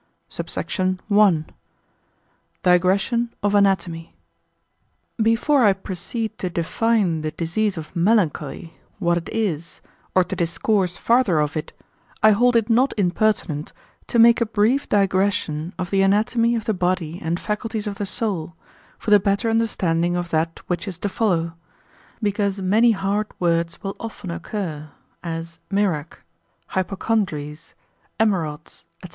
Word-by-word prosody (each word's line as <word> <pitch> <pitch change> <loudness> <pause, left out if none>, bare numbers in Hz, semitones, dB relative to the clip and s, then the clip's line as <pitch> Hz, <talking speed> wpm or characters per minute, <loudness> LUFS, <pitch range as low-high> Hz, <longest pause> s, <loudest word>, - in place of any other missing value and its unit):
SUBSECT. 185 -1 -2 0.2
I.—Digression 195 +3 0
of 205 0 +2
Anatomy. 180 - +1 1.1
Before 235 +5 +3
I 205 -3 +6
proceed 215 +4 -5
to 185 - -2
define 175 0 0
the 155 - -2
disease 180 +5 -1
of 160 +2 -8
melancholy, 170 -5 0 0.2
what 170 0 +1
it 165 - -10
is, 170 -8 -2 0.4
or 185 - +6
to 185 +2 -5
discourse 180 +2 0
farther 230 -9 +3
of 150 +1 0
it, 155 - -4 0.5
I 215 - +8
hold 240 +4 +3
it 225 -2 +3
not 245 +4 +3
impertinent 180 -5 0 0.3
to - - -1
make 235 +1 +6
a 235 - +2
brief 225 +6 +1
digression 190 -5 +1
of 180 -1 -4
the 195 -1 +3
anatomy 230 +4 +2
of 225 -2 -3
the 220 - +1
body 180 -3 -1
and 170 +1 -2
faculties 220 0 -3
of 205 -1 -4
the 205 - -2
soul, 185 -8 -2 0.4
for 215 - -4
the 205 - +8
better 200 +4 0
understanding 175 -7 +1
of 175 -1 -3
that 165 +1 -1
which 175 +3 -3
is 185 -4 -4
to 205 - -2
follow; 175 -7 0 0.7
because 200 -1 0
many 210 +5 +4
hard 200 +1 -1
words 170 -1 0
will 195 0 -4
often 215 -5 -6
occur, 165 -5 -5 0.3
as 165 -1 -6
mirach, 185 -7 -1 0.5
hypocondries, 180 -6 -2 0.4
emerods, 165 -8 -1 0.2
&c. - - -9
195 Hz, 135 wpm, -22 LUFS, 170-215 Hz, 1.1 s, I